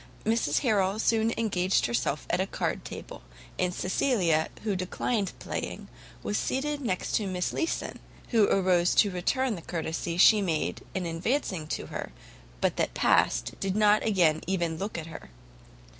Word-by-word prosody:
Mrs 225 +2 +1
Harrel 205 -6 +2
soon 225 0 +2
engaged 190 -4 +1
herself 120 +1 -1
at - - +2
a - - -1
card - - -2
table; - - -8 0.4
and 180 - +1
Cecilia, 180 - +1
who 210 -3 0
declined 190 +2 -1
playing, - - -5 0.3
was 210 - -1
seated 290 +2 -1
next 185 -8 -2
to 210 - -2
Miss 180 -1 -2
Leeson, 330 - -2 0.3
who 225 -4 +4
arose 180 -2 +3
to 205 - +4
return 250 +8 0
the 170 - -8
courtesy 165 0 -3
she 210 +3 +7
made 165 -5 -1
in 185 -2 -1
advancing 170 - -1
to - - -3
her, - - -5 0.5
but - - +1
that - - -1
past, - - +2
did 195 -1 -1
not 210 0 +4
again 175 -8 +3
even 170 -4 -1
look 200 -1 -3
at 165 - -5
her. 160 - -10
190 Hz, 160 wpm, -28 LUFS, 170-220 Hz, 0.5 s, she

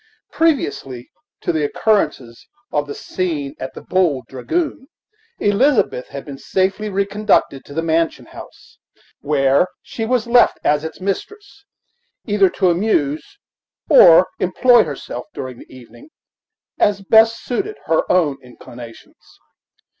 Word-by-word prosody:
Previously 145 - -1 0.3
to - - -1
the 155 -2 0
occurrence 150 - -1 0.2
of 145 0 -1
the 145 - -6
scene 155 -7 -3
at 130 - -7
the - - -10
"Bold 165 -10 0
Dragoon," 270 - -3 0.5
Elizabeth 205 - +1
had 140 - -8
been 140 -2 -9
safely 190 +3 -1
reconducted 200 -7 0
to - - -12
the 165 - -1
mansion 165 0 0
house, - - -14 0.4
where 140 +2 +2 0.2
she 225 - -6
was 250 -1 +1
left 240 +1 +4
as 150 0 +1
its 160 0 -7
mistress, 400 - -6 0.6
either 205 -3 +3
to 185 -1 +1
amuse 170 - -1 0.5
or - - +8
employ 245 -3 +4
herself 140 -5 -7
during 130 -2 -7
the - - -15
evening 130 - -15 0.7
as 200 -1 +2
best 225 +3 +4
suited 405 - -4
her 160 - +1
own 155 -7 +1
inclinations. 120 -2 -14
180 Hz, 125 wpm, -19 LUFS, 140-220 Hz, 0.7 s, or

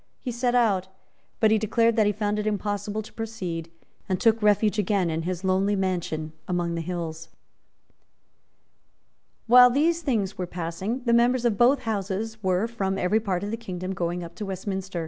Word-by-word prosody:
He 250 - -4
set 240 +1 0
out, 200 -6 +2 0.5
but 220 - +4
declared 230 +1 +2
that 215 -2 +3
he - - +3
found 210 0 -1
it 210 - -2
impossible 205 +1 -2
to - - -14
proceed, 185 -8 -5 0.4
and 185 - 0
took 225 -1 +3
refuge 210 0 +3
again 195 -4 +1
in 160 +1 -2
his 180 +2 -4
lonely 190 +2 +2
mansion 175 -5 -2
among 175 -2 -1
the 165 - -2
hills. 165 -1 -5 2.2
While 250 +2 +8
these 325 +6 +2
things 210 - -1
were 180 - -2
passing, 180 +8 -4
the 235 - +3
members 240 +1 +3
of 230 -3 +2
both 250 +5 +4
Houses 220 0 -3
were 190 +2 +1
from 195 -5 -2
every 195 +4 +2
part 195 -4 -2
of 205 - -3
the 225 - -2
kingdom 185 -4 -5
going 175 -1 -2
up 170 - -9
to 210 - -4
Westminster. 190 -1 -4
205 Hz, 175 wpm, -25 LUFS, 180-225 Hz, 2.2 s, While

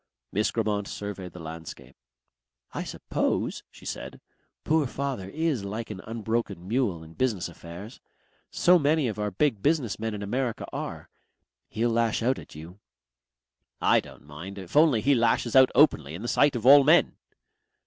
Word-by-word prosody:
Miss 105 +2 +1
Grammont 105 -3 -1
surveyed 100 -3 -6
the 90 - -10
landscape. 80 0 -9 0.8
"I - - -3
suppose," - - -2
she - - -16
said, - - -6 0.4
"poor 155 -2 +2
father 130 -8 -4
IS 155 -2 -1
rather 100 - -6
like 110 +2 -5
an 100 - -7
unbroken 110 -5 -3
mule 105 -8 0
in 80 0 -13
business 110 -6 -1
affairs. 85 +6 -10 0.5
So 180 0 +4
many 150 -1 +2
of 105 -2 -4
our 105 0 -1
big 110 +2 0
business 140 -8 0
men 110 -1 -3
in 105 - -5
America 120 +3 -2
are. - - -6 0.6
He'll 115 +2 0
lash 115 -1 +1
out 130 +3 +1
at - - -13
you." 85 +6 -11 1.0
"I - - +4
don't - - -12
mind 85 +7 -9
if 95 +3 -9
only 150 -7 +5
he 140 +6 +3
lashes 120 -1 +1
out 130 -1 +8
openly 80 - +4
in 95 - -7
the - - -3
sight 145 +2 +3
of 120 -1 -4
all 140 +2 +9
men." - - +4
110 Hz, 170 wpm, -27 LUFS, 95-130 Hz, 1.0 s, all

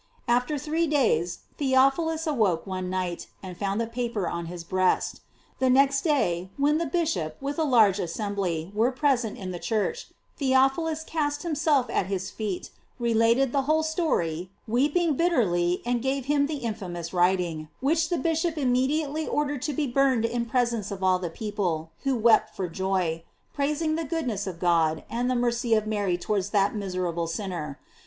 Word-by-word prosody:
After 250 +5 +1
three 315 +4 0
days 200 - +1 0.2
Theophilus 285 +4 +2
awoke 215 - +1
one 185 -1 -4
night, 180 -2 -3 0.2
and 185 -1 -7
found 200 +3 -2
the 230 - +1
paper 230 -5 -2
on 170 0 -3
his 175 0 -7
breast. 185 +2 0 0.4
The 260 - +3
next 275 +2 +4
day, 185 - +1
when 295 +2 +2
the 335 - -1
bishop 190 - -1
with 280 +3 -3
a - - +3
large 220 -9 +4
assembly 180 -2 -2
were 225 +5 +2
present 255 -5 0
in 185 -2 -5
the 175 - -5
church, 225 - -1 0.3
Theophilus 275 +4 +2
cast 290 -2 -2
himself 300 -5 +2
at 190 - 0
his 190 -1 -3
feet, 210 -5 -4 0.3
related 235 +2 +3
the 275 - +2
whole 315 0 +3
story, 185 - -1 0.2
weeping 290 +8 +2
bitterly, 180 - +2
and 240 -1 0
gave 265 0 -1
him 285 0 +2
the 300 0 -3
infamous 180 -6 -5
writing, 175 -3 +1
which 320 +4 +1
the 345 - 0
bishop 325 +2 0
immediately 285 +4 0
ordered 290 -2 -1
to 295 +1 -2
be 295 +2 0
burned 260 -3 +2
in 235 0 -1
presence 235 -4 0
of 195 -1 -6
all 185 -1 +3
the 175 -2 -3
people, 175 -5 -3
who 270 -1 +2
wept 230 -1 +3
for 185 - -2
joy, 180 -2 -1 0.3
praising 300 +2 0
the 325 +1 -1
goodness 255 - -2
of 180 -3 -5
God, 165 -3 +2
and 245 +2 0
the 255 - +1
mercy 240 -1 +1
of 215 -1 +1
Mary 205 -4 0
towards 195 +2 -1
that 200 -1 +2
miserable 180 -5 -2
sinner. 165 -5 -4
235 Hz, 170 wpm, -26 LUFS, 185-285 Hz, 0.4 s, next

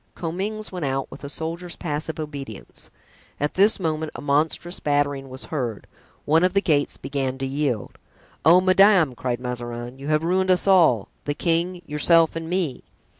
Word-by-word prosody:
Comminges 195 +6 -4
went 180 -3 -5
out 135 0 -2
with - - -11
a 140 - -5
soldier's 170 +3 -4
passive 155 -1 -3
obedience. 140 -8 -8 0.5
At 145 +1 -1
this 205 +3 +4
moment 160 -3 -2
a - - -6
monstrous 155 +5 0
battering 145 -2 0
was 130 0 -9
heard. 120 -8 -3 0.4
One 160 +3 +4
of 185 0 +2
the 200 - +4
gates 145 -6 +1
began 135 -2 -3
to 135 - -3
yield. 135 -5 -2 0.4
"Oh! 175 +3 +7
madame," 185 -5 +5
cried 120 0 -3
Mazarin, 120 0 -6
"you 140 - -7
have 155 +1 +1
ruined 185 +2 +1
us 180 -1 +3
all—the 145 - +2
king, 175 +2 0
yourself 165 +2 +3
and 165 0 -5
me." 175 -7 -1
155 Hz, 165 wpm, -23 LUFS, 135-175 Hz, 0.5 s, Oh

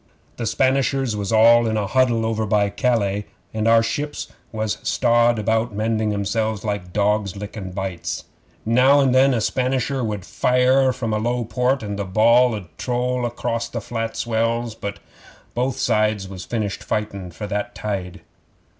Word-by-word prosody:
The 115 - -2
Spanishers 135 0 +1
was 100 -1 -3
all 115 +1 +6
in 110 -1 0
a 105 - 0
huddle 120 0 +2
over 110 -1 -1
by 100 -1 +2
Calais, 105 -5 0 0.3
and 110 0 -1
our 115 0 +5
ships 145 +5 -3 0.2
was 110 -1 -2
strawed 120 -1 +3
about 110 +1 0
mending 110 0 0
'emselves 105 +1 -1
like 100 -4 -3
dogs 105 -1 +1
lickin' 100 -1 -6
bites. 95 -2 -4 0.4
Now 130 +5 +5
and 135 -2 +3
then 135 +1 +5
a - - +1
Spanisher 130 +4 0
would 105 -4 -3
fire 130 +1 +3
from 115 -4 -3
a 105 - +1
low 120 +2 -1
port, 125 +3 0
and 100 -1 -4
the - - 0
ball 115 +5 +4
'ud 105 -3 -6
troll 125 0 -1
across 115 0 -3
the 120 - -4
flat 115 +1 -4
swells, 115 0 -1
but 100 -2 -6 0.6
both 125 +1 -1
sides 105 -2 +1
was 95 -2 -8
finished 105 -4 -3
fightin' 100 -4 -3
for 95 +5 -7
that 105 0 -3
tide. 95 -3 -4
110 Hz, 165 wpm, -22 LUFS, 105-120 Hz, 0.6 s, all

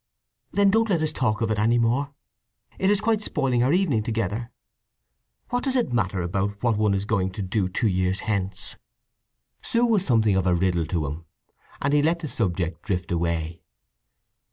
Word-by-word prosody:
"Then 200 -1 +4
don't 225 +1 +2
let 170 -5 +2
us 155 - 0
talk 120 -7 -1
of 115 -1 0
it 105 - 0
any 115 +3 +3
more. 125 +5 +1 0.7
It 190 - +2
is 205 -1 +3
quite 220 0 +1
spoiling 130 - 0
our 130 +3 +3
evening 170 - +2
together. 115 +1 -2 1.0
What 245 0 -1
does 265 -2 0
it 240 - +1
matter 95 -5 0
about 100 +4 -2
what 115 -3 +3
one 105 -1 +2
is 100 +1 -2
going 100 -4 0
to 100 - -4
do 95 0 -1
two 115 - -1
years 95 0 0
hence!" 95 -3 -3 0.8
She 230 - +1
was 230 -5 +3
something 110 - +3
of 95 -1 +1
a 90 - +3
riddle 85 -2 +1
to 80 -3 -1
him, 75 +4 -6 0.6
and 145 +1 +1
he 150 - +5
let 165 +3 +2
the 165 -2 -6
subject 90 - -2
drift 90 -6 -3
away. 85 -1 -1
110 Hz, 185 wpm, -25 LUFS, 95-145 Hz, 1.0 s, he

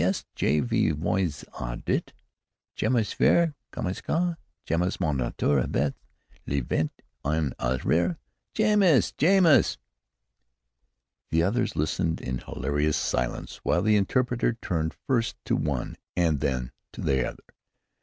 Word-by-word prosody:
Qu'est - - +2
ce - - -6
que 75 - +2
je 110 -8 +2
vous 80 -2 -2
ai - - -3
dit? - - 0 0.6
Jamais 115 +1 +2
faire 165 - +3 0.2
comme 90 - -3
ça! 170 - -1 0.3
Jamais 85 +3 +1
monter 70 -3 +1
avec 70 +3 0 0.5
le 70 0 0
vent 80 +5 0 0.3
en 75 -1 0
arrière! 80 +8 +1 0.4
Jamais! 195 -9 +5 0.2
Jamais!" 175 -2 +5 1.5
The 80 +1 +2
others 115 +6 0
listened 80 +2 0
in 65 -1 -3
hilarious 75 +2 -1
silence 65 -1 -2
while - - +1
the 105 0 +4
interpreter 120 +3 +1
turned 80 -6 -2
first 115 -4 +1
to - - +1
one 70 -4 -2 0.2
and 80 -5 +2
then 65 -4 -1 0.2
to - - -7
the 65 -2 +2
other. - - -13
80 Hz, 125 wpm, -27 LUFS, 70-115 Hz, 1.5 s, Jamais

